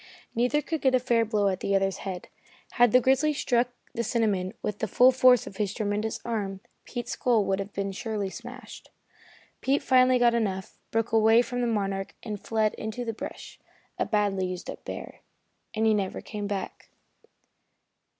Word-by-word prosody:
Neither 250 +6 +1
could 320 +1 -3
get 260 -1 +4
a - - +4
fair 235 -2 +2
blow 210 -2 +1
at 190 -1 0
the 200 - 0
other's 195 0 +1
head. 185 -3 -6 0.4
Had 245 -2 +4
the 250 - +7
grizzly 270 +4 +3
struck 245 -3 +1 0.2
the 235 - -1
cinnamon 210 -4 0
with 210 -1 -3
the 220 - -1
full 250 +5 +6
force 255 -1 +5
of 195 - -10
his 205 -1 -1
tremendous 215 0 -2
arm, 200 -5 -2 0.3
Pete's 240 -1 -5
skull 230 -5 +2
would 195 0 0
have 195 +1 -4 0.3
surely 215 -1 -3
been 190 - -4
smashed. 245 +4 -10 0.7
Pete 275 +2 +1
finally 255 -1 +5
got 240 -1 +4
enough, 195 -5 -2
broke 225 +1 -1
away 225 +1 +5
from 245 0 -3
the 240 - +1
Monarch 195 -3 -2
and 210 -3 -6
fled 220 -1 +1
into 220 +3 -4
the 225 - -2
brush, - - -8 0.4
a - - +2
badly 200 -3 +1
used 180 -1 -5
up - - -11
bear; - - -7 0.6
and 220 +1 +1
he 220 - +5
never 200 -3 -1
came 210 -2 -5
back. 200 -2 -5
220 Hz, 180 wpm, -27 LUFS, 200-245 Hz, 0.7 s, the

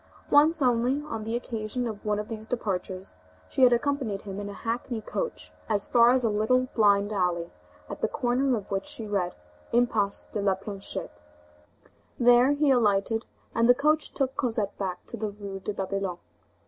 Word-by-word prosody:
Once 305 +1 +5
only, 250 +3 +2
on 225 -8 -5
the 225 +1 -2
occasion 235 0 -3
of 215 -3 -5
one 210 -1 0
of 210 0 -4
these 220 -1 -5
departures, 190 -5 -3 0.3
she - - -2
had 250 -1 +8
accompanied 240 -5 0
him 195 -1 -6
in 205 0 -5
a - - -7
hackney 230 +2 -3
coach 485 - -4 0.2
as 205 -2 +1
far 235 -1 +5
as 255 0 +3
a 230 - +3
little 255 +5 +2
blind 205 -1 +3
alley 175 -3 0 0.4
at - - -7
the - - +2
corner 255 0 +1
of 205 -2 -8
which 195 0 -2
she 225 - -5
read: 195 -4 -1 0.4
Impasse 225 -4 +2
de 210 - -4
la 195 -1 +2
Planchette. 195 - -7 1.0
There 245 +3 +6
he 290 -1 +3
alighted, 225 -2 +2 0.3
and 230 +1 +3
the 245 - +8
coach 300 +3 +1
took 265 -2 -1
Cosette 220 -6 -1
back 185 -3 -4
to - - -7
the 215 0 -2
Rue 200 -1 -7
de 200 - -4
Babylone. 195 -2 -3
220 Hz, 180 wpm, -27 LUFS, 200-245 Hz, 1.0 s, had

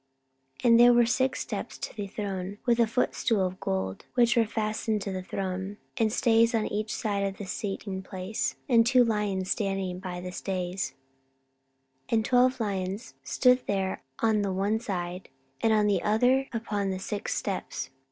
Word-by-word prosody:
14:009:018 - - -7
And 230 0 +7
there 240 0 +8
were 240 0 +5
six 260 +3 +1
steps - - -5
to - - -6
the 205 -2 -4
throne, 195 -1 -4
with 240 -1 +3
a 230 - +5
footstool 225 -3 +1
of 185 0 -4
gold, 95 0 -2
which 240 -1 +4
were 230 -2 +3
fastened 215 0 -1
to 200 - -3
the 185 -1 -3
throne, 190 +1 -4 0.2
and 220 -2 +2
stays 230 0 +3
on 220 -1 +1
each 215 +1 -2
side 200 -2 -1
of 195 -1 -2
the 205 - -6
sitting 195 0 -4
place, 190 +2 -3
and 235 -3 +6
two 250 +1 +5
lions 205 -4 -1
standing 195 -3 -1
by 180 -1 -5
the 180 0 -6
stays: 185 0 -3 1.1
14:009:019 - - -3
And 220 -1 +2
twelve 255 +1 +3
lions 200 +1 -3
stood 250 -1 +4
there 190 -1 -1 0.2
on 220 -2 +3
the 200 -1 -1
one 200 +4 0
side 180 -4 -4 0.3
and 225 - +3
on 215 -1 +4
the 200 -4 +2
other 250 +5 +3
upon 210 -4 -2
the 190 - -2
six 200 +2 -3
steps. 160 -8 -3
205 Hz, 180 wpm, -28 LUFS, 190-230 Hz, 1.1 s, there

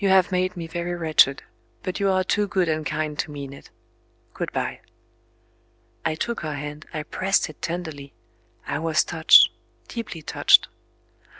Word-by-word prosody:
You 195 - +3
have 190 -1 +4
made 185 0 0
me 170 - -4
very 170 +2 -4
wretched, 155 -5 +3 0.4
but 185 -2 -3
you 200 -1 +2
are 185 0 +2
too 205 +2 0
good 190 -3 +1
and 155 -1 -1
kind 155 0 -3
to - - -1
mean 140 -2 -7
it. 140 - -14 0.6
Good - - -4
bye." - - -3 1.2
I 160 - 0
took 235 +8 -3
her 155 -2 -4
hand, 150 +2 -7
I 155 -2 -4
pressed 190 +1 0
it 150 - -24
tenderly; 160 -5 -5 0.5
I - - -2
was 160 -1 +2
touched, 160 -2 +6 0.4
deeply 215 -9 -6
touched. - - +4
165 Hz, 165 wpm, -24 LUFS, 155-185 Hz, 1.2 s, touched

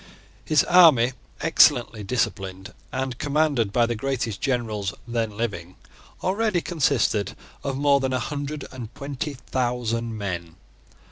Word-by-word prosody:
His 155 -2 +4
army, 155 -9 +6 0.3
excellently 125 -8 +4
disciplined, 95 -4 -2 0.2
and 130 -1 -3
commanded 145 -7 +1
by 120 +2 +3
the 120 - -1
greatest 120 -3 -2
generals 110 -7 -1
then 115 -3 -2
living, 90 -6 -4 0.5
already 200 0 +1
consisted 135 - +1 0.3
of 135 -1 -2
more 140 0 +4
than 130 -1 -1
a - - +2
hundred 145 +3 -4
and 120 -4 -7
twenty 140 +1 -4
thousand 120 -3 -2
men. 85 -5 -4
125 Hz, 125 wpm, -24 LUFS, 110-140 Hz, 0.5 s, army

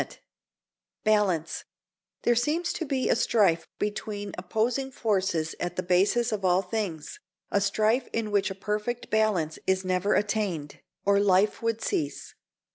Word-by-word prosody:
XV - - -8 0.9
BALANCE 200 -7 +1 0.6
There 240 - +4
seems 300 +9 0
to 330 - -3
be 265 -2 0
a - - +4
strife 185 -7 +2
between 205 -1 -3
opposing 230 +8 -1
forces 190 -10 0
at 175 0 -3
the 185 - -2
basis 200 +7 +2
of 210 -2 -2
all 185 +1 +3
things, 180 -6 -4 0.3
a 200 - +2
strife 215 +5 +2
in 225 -2 -2
which 200 -1 +2
a 190 - -5
perfect 210 +4 -3
balance 205 -8 +1
is 190 0 +1
never 185 +2 +1
attained, 200 -8 -1 0.3
or 200 0 +4
life 200 +1 +3
would 230 -1 -1
cease. 145 -2 -2
205 Hz, 145 wpm, -27 LUFS, 185-220 Hz, 0.9 s, There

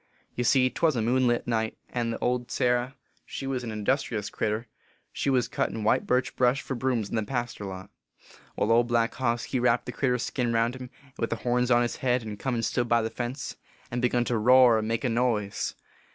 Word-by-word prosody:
Ye 125 - -2
see 130 +1 +4
twas 160 -4 +1
a 115 - 0
moonlight 120 0 +2
night, 110 -2 -1
and 115 -2 -2
old 125 0 0
Sarah 125 +2 0 0.3
she - - -6
was 130 -2 -2
an 115 - -4
industrious 110 -1 -1
critter 110 +2 -2 0.5
she - - -1
was 130 -3 +2
cuttin 110 - -2
white 110 - +2
birch 125 0 +1
brush 125 +2 +3
for 135 - -5
brooms 120 -4 -1
in - - -3
th - - +2
e - - -5
paster 120 -4 -3
lot. 95 +1 -8 0.6
Wai, - - +1
Old 115 +2 +3
Black 115 -1 +1
Hoss 120 -2 -1
he 130 - -2
wrapped 120 0 +2
the - - -4
critter 125 0 0
s 125 - -2
skin 120 0 -1
round 115 +2 +1
him, 130 -1 -8 0.3
with 115 - 0
the - - -1
horns 125 0 +2
on 120 -1 +5
his 120 - -3
head, 125 -2 +1
and 105 -2 -7
come 130 -2 -1
and 115 -1 -1
stood 120 -1 -1
by 115 -1 +3
the 110 - -3
fence, 125 +3 -5 0.3
and 120 0 -2
begun 125 -1 +2
to 120 -2 0
roar 125 0 +6
and 110 - -3
make 115 0 -1
a - - +2
noise. 115 -4 0
120 Hz, 225 wpm, -27 LUFS, 115-125 Hz, 0.6 s, roar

